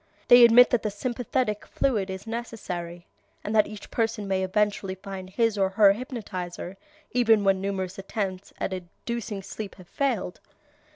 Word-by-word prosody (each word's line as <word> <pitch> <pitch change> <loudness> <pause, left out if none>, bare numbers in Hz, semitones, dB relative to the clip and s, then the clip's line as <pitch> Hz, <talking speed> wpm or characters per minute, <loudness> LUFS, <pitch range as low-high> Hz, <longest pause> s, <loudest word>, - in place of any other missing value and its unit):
They 245 0 +9
admit 235 +1 +8
that 245 - +2
the 215 - -1
sympathetic 240 0 -2
fluid 215 -8 0
is 190 +1 -6
necessary, 180 -7 -5 0.4
and 210 - -2
that 215 - +5
each 210 -1 -10
person 225 -3 -1
may 190 -1 0
eventually 195 0 0
find 190 -1 -8
his 225 +1 +1
or 190 -1 +3
her 200 +1 +6
hypnotizer, 195 -7 -6 0.4
even 225 -4 +4
when 195 -1 +3
numerous 190 -1 -3
attempts 195 -1 -4
at 195 - -2
inducing 200 +3 -5
sleep 200 +1 -7
have 185 -3 -15
failed. 245 -7 -2
205 Hz, 155 wpm, -26 LUFS, 190-230 Hz, 0.4 s, They